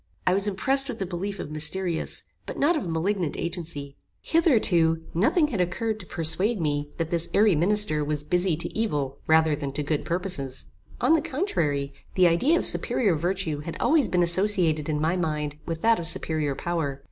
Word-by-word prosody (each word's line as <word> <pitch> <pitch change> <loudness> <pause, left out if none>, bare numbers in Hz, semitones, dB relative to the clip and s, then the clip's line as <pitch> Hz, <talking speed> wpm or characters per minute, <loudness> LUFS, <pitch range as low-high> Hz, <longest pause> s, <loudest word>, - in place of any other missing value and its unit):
I 180 - +3
was 200 +2 +1
impressed 270 +8 +4
with 240 - -5
the 195 - -3
belief 190 +3 -5
of - - -6
mysterious, 165 +3 +1 0.2
but - - -6
not 320 +5 +2
of 285 - -3
malignant 170 0 -2
agency. 165 -5 -5 0.3
Hitherto 195 - +2
nothing 280 - +2
had 210 -9 -1
occurred 215 +5 -2
to 185 - -12
persuade 175 +7 0
me 145 -2 -2
that 165 -1 -3
this 170 -1 -1
airy 210 -1 +4
minister 175 -2 +3
was 150 0 -2
busy 180 +1 0
to 170 - -6
evil 145 -11 -2
rather 160 -1 +3
than 140 -2 -5
to 150 - -3
good 145 0 -2
purposes. 170 -7 -3 0.4
On - - +4
the 325 - +3
contrary, 170 - -2 0.2
the 185 - +4
idea 255 - +2
of - - +1
superior 200 -9 +2
virtue 175 -1 -2
had 160 +3 -7
always 300 -6 +2
been 180 -1 +2
associated 175 -4 +3
in 150 -1 -1
my 160 +4 0
mind 150 -4 -3
with 165 -1 -5
that 230 0 +3
of 165 - -1
superior 155 -4 -1
power. 150 -4 -3
170 Hz, 185 wpm, -25 LUFS, 155-205 Hz, 0.4 s, impressed